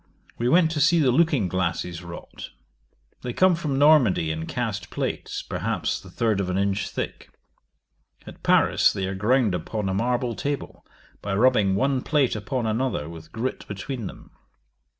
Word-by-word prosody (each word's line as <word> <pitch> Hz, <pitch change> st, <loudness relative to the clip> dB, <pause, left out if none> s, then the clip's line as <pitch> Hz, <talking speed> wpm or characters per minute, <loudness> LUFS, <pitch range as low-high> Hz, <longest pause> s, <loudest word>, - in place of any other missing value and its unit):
We 120 Hz, +1 st, +1 dB
went 165 Hz, +2 st, +4 dB
to 155 Hz, -2 st, -1 dB
see 165 Hz, +3 st, +5 dB
the 140 Hz, -6 st, +4 dB
looking 145 Hz, -, +3 dB
glasses 90 Hz, -1 st, -2 dB
wrought. 85 Hz, -1 st, -9 dB, 0.7 s
They 125 Hz, -, -4 dB
come 185 Hz, +5 st, +4 dB
from 155 Hz, -5 st, -2 dB
Normandy 135 Hz, -, +4 dB
in 80 Hz, +1 st, -4 dB
cast 105 Hz, -8 st, -3 dB
plates, -, -, -3 dB
perhaps -, -, -2 dB
the -, -, -13 dB
third 110 Hz, -4 st, 0 dB
of 95 Hz, -2 st, -1 dB
an 90 Hz, -, -1 dB
inch 100 Hz, +1 st, 0 dB
thick. -, -, -5 dB, 1.0 s
At -, -, -12 dB
Paris -, -, +4 dB
they 95 Hz, -, -3 dB
are 95 Hz, -, -3 dB
ground 110 Hz, +2 st, +2 dB
upon 95 Hz, +4 st, -3 dB
a -, -, -1 dB
marble 120 Hz, +3 st, 0 dB
table, 140 Hz, +6 st, -4 dB, 0.4 s
by 100 Hz, -1 st, -2 dB
rubbing 105 Hz, -4 st, +3 dB
one 135 Hz, +5 st, +1 dB
plate 140 Hz, -5 st, +1 dB
upon 115 Hz, +4 st, -3 dB
another 110 Hz, -, -1 dB
with 80 Hz, -1 st, -11 dB
grit 120 Hz, +3 st, -4 dB
between 105 Hz, +3 st, -5 dB
them. -, -, -12 dB
115 Hz, 165 wpm, -24 LUFS, 95-135 Hz, 1.0 s, see